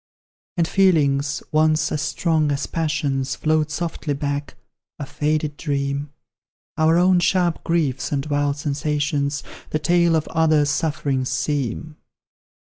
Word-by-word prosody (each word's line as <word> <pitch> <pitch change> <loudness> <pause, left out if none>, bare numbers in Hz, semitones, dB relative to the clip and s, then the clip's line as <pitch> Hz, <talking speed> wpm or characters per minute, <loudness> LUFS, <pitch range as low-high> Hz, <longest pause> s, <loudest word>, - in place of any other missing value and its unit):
And 165 -1 +2
feelings, 145 -7 +2
once 155 0 +2
as 150 - -1
strong 155 -1 0
as 140 0 -1
passions, 140 -5 -1
Float 155 +1 +1
softly 155 -2 -3
back 145 0 -3 0.4
a 145 - -5
faded 150 +1 -1
dream; 140 -1 -2 0.6
Our 160 +1 +3
own 180 +1 +4
sharp 175 -1 +1
griefs 155 -6 0
and 140 -1 -1
wild 145 -1 0
sensations, 145 -1 -1 0.3
The - - 0
tale 170 +1 +3
of 155 - 0
others' 155 -2 +2
sufferings 145 -5 -1
seem. 145 +2 -2
150 Hz, 125 wpm, -22 LUFS, 145-160 Hz, 0.6 s, own